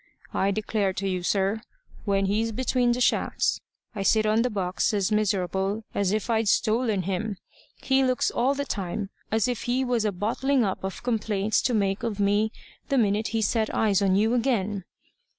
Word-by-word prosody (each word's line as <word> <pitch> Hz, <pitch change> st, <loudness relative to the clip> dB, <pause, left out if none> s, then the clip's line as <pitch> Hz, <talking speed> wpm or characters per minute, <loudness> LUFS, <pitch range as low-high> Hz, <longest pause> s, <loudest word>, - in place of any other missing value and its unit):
I 195 Hz, -, +1 dB
declare 205 Hz, -1 st, 0 dB
to 195 Hz, +1 st, -3 dB
you, 185 Hz, -1 st, -1 dB
sir, 195 Hz, +4 st, 0 dB, 0.4 s
when 195 Hz, -1 st, +1 dB
he's 215 Hz, +3 st, 0 dB
between 245 Hz, +1 st, +1 dB
the 250 Hz, -, -3 dB
shafts, -, -, +1 dB, 0.3 s
I 210 Hz, -, -4 dB
sit 215 Hz, +2 st, +3 dB
on 215 Hz, +1 st, +3 dB
the 250 Hz, -, +1 dB
box 190 Hz, -1 st, -1 dB
as 200 Hz, +1 st, 0 dB
miserable 195 Hz, 0 st, 0 dB
as 200 Hz, -2 st, +1 dB
if 215 Hz, 0 st, -1 dB
I'd 225 Hz, -2 st, +1 dB
stolen 215 Hz, -2 st, +2 dB
him. 195 Hz, +3 st, -2 dB, 0.5 s
He 265 Hz, 0 st, +3 dB
looks 255 Hz, -1 st, +1 dB
all 265 Hz, +4 st, +1 dB
the 285 Hz, 0 st, -2 dB
time 195 Hz, -2 st, -4 dB, 0.2 s
as 220 Hz, +2 st, +2 dB
if 245 Hz, -3 st, -3 dB
he 255 Hz, +2 st, +1 dB
was 245 Hz, -3 st, +1 dB
a 210 Hz, -, +1 dB
bottling 235 Hz, +7 st, 0 dB
up 190 Hz, -3 st, -2 dB
of 190 Hz, +3 st, -5 dB
complaints 215 Hz, -3 st, 0 dB
to 245 Hz, -, 0 dB
make 195 Hz, -2 st, 0 dB
of 225 Hz, -4 st, -3 dB
me 205 Hz, +2 st, +2 dB, 0.4 s
the 275 Hz, -, +2 dB
minute 215 Hz, -1 st, +2 dB
he 225 Hz, -1 st, -1 dB
set 220 Hz, +1 st, +1 dB
eyes 205 Hz, -3 st, +2 dB
on 190 Hz, -1 st, +3 dB
you 220 Hz, +4 st, +2 dB
again. 215 Hz, -6 st, 0 dB
215 Hz, 185 wpm, -26 LUFS, 195-230 Hz, 0.5 s, sit